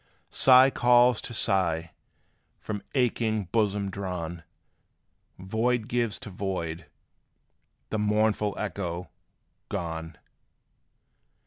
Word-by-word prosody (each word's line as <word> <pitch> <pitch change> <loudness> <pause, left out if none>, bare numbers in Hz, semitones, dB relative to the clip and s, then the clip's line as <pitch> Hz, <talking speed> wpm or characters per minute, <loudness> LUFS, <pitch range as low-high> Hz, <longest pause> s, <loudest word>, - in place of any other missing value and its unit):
Sigh 130 +1 +6
calls 120 -1 +4
to - - -7
sigh, 85 -6 0 0.7
from 105 -2 -5
aching 115 -4 +1
bosoms 105 -3 0
drawn. 90 -3 -5 1.0
Void 110 +5 -1
gives 120 -4 -1
to 105 - -8
void 90 -4 -4 1.0
the 110 - -1
mournful 105 0 +1
echo, 90 -4 -4 0.6
"_gone! 80 -3 -4
100 Hz, 85 wpm, -27 LUFS, 90-115 Hz, 1.0 s, Sigh